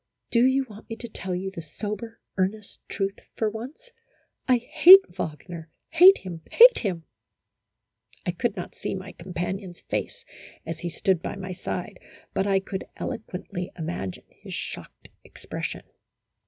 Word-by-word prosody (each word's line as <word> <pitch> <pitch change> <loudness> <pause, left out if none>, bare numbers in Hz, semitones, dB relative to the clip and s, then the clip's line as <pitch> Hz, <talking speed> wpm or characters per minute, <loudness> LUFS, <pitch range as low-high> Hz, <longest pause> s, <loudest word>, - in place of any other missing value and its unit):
"Do 235 0 +4
you 265 +1 +2
want 210 -1 -13
me 225 - -4
to 235 +1 -7
tell 190 -4 -4
you 190 +2 -3
the 170 - -7
sober, 210 +7 -6 0.2
earnest 200 +2 -2
truth 195 0 -2 0.2
for 220 -2 0
once, 270 - -9 0.6
I 255 -2 +5
hate 365 +11 +9
Wagner 160 -1 -6 0.2
hate 360 +4 +8
him 175 -3 -8
hate - - +8
him! 180 -7 -2 0.6
" 110 +1 -35
I 175 - +1
could 215 +5 -1
not 180 - -6
see - - -4
my 190 0 -7
companion's 180 +1 -5
face - - -4 0.4
as 165 0 -5
he 175 - -3
stood 185 0 +1
by - - -4
my 190 -2 -6
side, 180 - -5 0.3
but 195 - 0
I 195 -1 +3
could 190 0 -5
eloquently 180 -2 -5
imagine 160 - -4
his - - -9
shocked - - -7
expression. - - -6
195 Hz, 155 wpm, -26 LUFS, 175-225 Hz, 0.6 s, hate